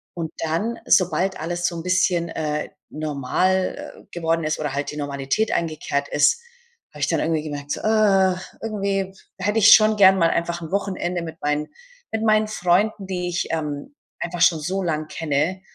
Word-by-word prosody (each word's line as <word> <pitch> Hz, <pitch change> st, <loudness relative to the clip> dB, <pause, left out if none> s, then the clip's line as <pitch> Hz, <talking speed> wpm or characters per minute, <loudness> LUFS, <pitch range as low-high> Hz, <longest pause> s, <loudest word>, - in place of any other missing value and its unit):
Und 165 Hz, -2 st, -4 dB
dann, 170 Hz, +9 st, -1 dB
sobald 185 Hz, +1 st, +2 dB
alles 175 Hz, +2 st, -1 dB
so 175 Hz, -, -3 dB
'n 165 Hz, -, -5 dB
bisschen, 180 Hz, -1 st, +1 dB
äh, 150 Hz, -1 st, -3 dB, 0.2 s
normal 155 Hz, +5 st, -2 dB
geworden 165 Hz, -1 st, -1 dB
ist 155 Hz, 0 st, -1 dB
oder 150 Hz, -3 st, -2 dB
halt 140 Hz, +1 st, -2 dB
die 150 Hz, -, -8 dB
Normalität 145 Hz, +8 st, -1 dB
eingekehrt 155 Hz, -3 st, -1 dB
ist, 145 Hz, -, +3 dB, 0.5 s
habe -, -, -11 dB
ich -, -, +2 dB
dann -, -, +1 dB
irgendwie 160 Hz, -2 st, 0 dB
gemerkt 145 Hz, -2 st, -6 dB
so, -, -, -5 dB
äh, 200 Hz, -4 st, +3 dB, 0.3 s
irgendwie 195 Hz, -3 st, -2 dB, 0.2 s
hätte 205 Hz, +4 st, 0 dB
ich 210 Hz, 0 st, +10 dB
schon 215 Hz, 0 st, +3 dB
gern 190 Hz, -1 st, +7 dB
mal 165 Hz, -2 st, +3 dB
einfach 170 Hz, 0 st, -1 dB
'n 160 Hz, -, -8 dB
Wochenende 185 Hz, -3 st, -2 dB
mit 160 Hz, -1 st, -8 dB
meinen 150 Hz, +1 st, -1 dB, 0.4 s
mit 220 Hz, 0 st, -2 dB
meinen 215 Hz, -1 st, +3 dB
Freunden, 200 Hz, +1 st, +1 dB
die 180 Hz, -2 st, -3 dB
ich, 175 Hz, +1 st, -2 dB
ähm, 150 Hz, -, -4 dB, 0.2 s
einfach 175 Hz, 0 st, -4 dB
schon 175 Hz, -2 st, +5 dB
so 185 Hz, +6 st, -2 dB
lang 155 Hz, -3 st, -2 dB
kenne 160 Hz, +4 st, -1 dB
175 Hz, 175 wpm, -22 LUFS, 155-195 Hz, 0.5 s, ich